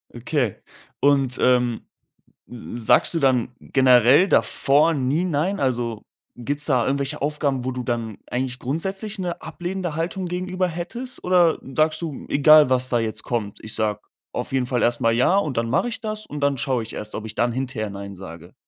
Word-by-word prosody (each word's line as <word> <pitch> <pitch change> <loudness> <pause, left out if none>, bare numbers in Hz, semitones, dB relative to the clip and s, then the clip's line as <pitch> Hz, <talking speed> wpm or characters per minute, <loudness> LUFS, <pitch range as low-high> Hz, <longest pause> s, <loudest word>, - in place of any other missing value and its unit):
Okay. 120 -2 -1 0.4
Und, 135 -3 +2
ähm, 125 -2 +2 0.7
sagst 120 +2 +1
du 165 - 0
dann 130 -5 +2
generell 130 - +5
davor 150 -3 +3
nie 140 +4 0
nein? 180 +4 -1
Also, 120 -5 -1 0.3
gibt's 145 +5 -3
da 130 -5 +2
irgendwelche 140 0 -1
Aufgaben, 140 -3 -1
wo 130 - -1
du 125 0 -4
dann 115 -3 -3
eigentlich 125 0 -3
grundsätzlich 195 - -3
'ne 175 -2 -4
ablehnende 175 0 -4
Haltung 180 +3 -3
gegenüber 185 +1 -2
hättest? 180 +10 -5
Oder 180 -3 +3 0.2
sagst 155 +1 +2
du: 155 -5 -5
„Egal, 150 0 +6
was 130 0 +2
da 120 - +2
jetzt 110 -1 -3
kommt, 110 -4 -3
ich 110 - -5
sage 105 -2 0 0.3
auf - - -4
jeden 130 -2 0
Fall 125 -1 0
erst 120 0 +1
mal 115 - +3
ja, 130 +10 +3
und 150 -11 -1
dann 115 0 0
mache 190 - +1
ich 230 - -6
das, 215 -1 -4
und 145 0 -6
dann 140 -1 +1
schaue 130 -3 0
ich 110 - -8
erst, 105 0 -6
ob 110 - -5
ich 110 - -7
dann 120 +1 +1
hinterher 125 -3 -3
nein 100 0 -7
sage?“ 85 -3 -11
135 Hz, 185 wpm, -23 LUFS, 120-165 Hz, 0.7 s, Egal